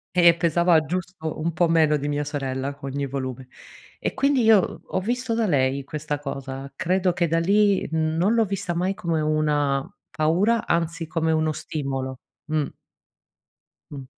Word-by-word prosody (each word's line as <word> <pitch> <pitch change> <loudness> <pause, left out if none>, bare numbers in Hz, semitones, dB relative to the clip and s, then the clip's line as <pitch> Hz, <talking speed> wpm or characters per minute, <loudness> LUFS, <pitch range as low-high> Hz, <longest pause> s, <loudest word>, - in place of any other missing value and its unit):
e 170 -1 +7
pesava 170 0 +3
giusto 175 -1 -4
un 165 +1 -1
po' 175 0 +2
meno 160 -2 +4
di 145 0 -4
mia 145 0 -1
sorella, 140 -1 -3
ogni 140 +1 -3
volume. 130 -1 -5 0.5
E - - -2
quindi 275 -1 +2
io 220 -4 +4
ho - - -2
visto 240 +4 -2
da 230 -1 +1
lei, 140 -4 +1
questa 150 +1 -4
cosa. 135 -1 -6
Credo 180 +3 +1
che 175 -1 +1
da 165 - +1
lì, 200 +3 +3
uhm 160 0 0
non 195 +6 +3
l'ho 230 -1 +3
vista 195 -2 -3
mai 180 +3 0
come 170 -6 -1
una 150 -3 +1 0.2
paura, 190 +9 +1
anzi 165 0 -1
come 160 0 0
uno 155 0 +1
stimolo 135 -4 -4 0.2
mh. 155 -2 -1 1.2
Mh. 140 -2 -7
160 Hz, 160 wpm, -24 LUFS, 140-180 Hz, 1.2 s, e